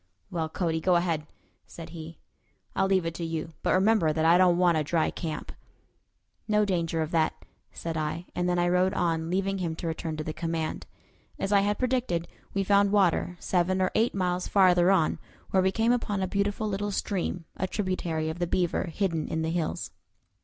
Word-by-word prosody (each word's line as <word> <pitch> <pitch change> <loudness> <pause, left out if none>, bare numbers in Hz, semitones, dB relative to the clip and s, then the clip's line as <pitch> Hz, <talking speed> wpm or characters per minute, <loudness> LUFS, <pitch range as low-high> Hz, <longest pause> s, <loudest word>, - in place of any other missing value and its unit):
"Well, 165 -3 -2
Cody, 160 -1 -1
go 180 +1 +3
ahead," 165 -3 0 0.4
said 165 - -9
he; 165 -1 -9 0.6
"I'll 195 - +2
leave 190 -3 +2
it 165 - -2
to 170 - -5
you; 165 0 -4
but - - +2
remember 190 -4 +3
that 160 +1 0
I 165 +1 +6
don't 180 -1 +5
want 175 -2 +4
a - - 0
dry 160 +2 +1
camp." 160 -3 -5 1.0
"No 210 -1 +3
danger 165 -4 0
of 155 - -6
that," 160 -3 0 0.3
said 165 -1 -5
I; 155 +2 -2
and 180 0 0
then 175 - +1
I 175 0 +2
rode 180 +2 +2
on, 165 -1 0
leaving 195 +2 0
him 170 -3 -2
to 170 - -7
return 160 -1 -3
to 155 - -3
the 155 - -4
command. 165 -1 -3 0.5
As 195 - -2
I 200 - +6
had 205 +1 +1
predicted, 245 -10 0 0.2
we 195 - 0
found 200 0 +4
water 180 -3 +2
seven 185 +1 +1
or 185 -1 +1
eight 225 0 +2
miles 180 -1 0
farther 180 -2 +5
on, 185 -5 +2 0.3
where 190 - +4
we 190 0 +2
came 225 +4 +2
upon 210 -5 0
a - - 0
beautiful 200 +2 -1
little 205 0 -2
stream, 185 -3 -2
a 185 - -2
tributary 180 -5 -2
of 160 +2 -4
the 175 - 0
Beaver, 175 +1 0
hidden 170 -2 -1
in 160 0 -2
the 160 - -1
hills. 155 - -2
175 Hz, 200 wpm, -27 LUFS, 165-195 Hz, 1.0 s, I